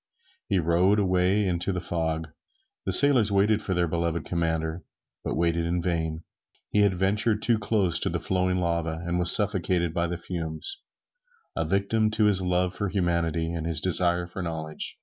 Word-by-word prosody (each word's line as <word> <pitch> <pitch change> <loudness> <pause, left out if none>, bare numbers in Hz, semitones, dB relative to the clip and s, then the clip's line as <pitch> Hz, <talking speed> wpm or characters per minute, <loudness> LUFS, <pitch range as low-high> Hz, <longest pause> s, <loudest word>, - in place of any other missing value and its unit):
He - - +1
rowed 90 +4 +2
away 95 +1 +1
into 90 +1 -1
the 90 - -3
fog. 80 -2 -3 0.6
The - - +1
sailors 130 -7 +6
waited 105 +2 +2
for 95 -3 -3
their 85 0 +1
beloved 85 0 -2
commander, 80 -1 -2 0.4
but - - -3
waited 85 +1 0
in 85 +1 -1
vain. 80 -2 -3 0.5
He 105 - +1
had 100 -2 +2
ventured 105 +4 0
too 115 -3 +2
close 105 -4 +1
to - - -1
the - - -3
flowing 90 0 -1
lava, 85 -2 -2
and 85 0 -1
was 90 0 +7
suffocated 90 -5 +2
by 85 0 -1
the 85 0 -4
fumes, 85 - -5 0.7
a - - -1
victim 105 +3 0
to 110 - +3
his 100 -3 +2
love 90 0 0
for 100 -2 -3
humanity 85 -3 -1
and 85 -1 -4
his 80 -2 +2
desire 90 0 +2
for 90 +2 -8
knowledge. 80 -2 -5
90 Hz, 175 wpm, -25 LUFS, 85-100 Hz, 0.7 s, was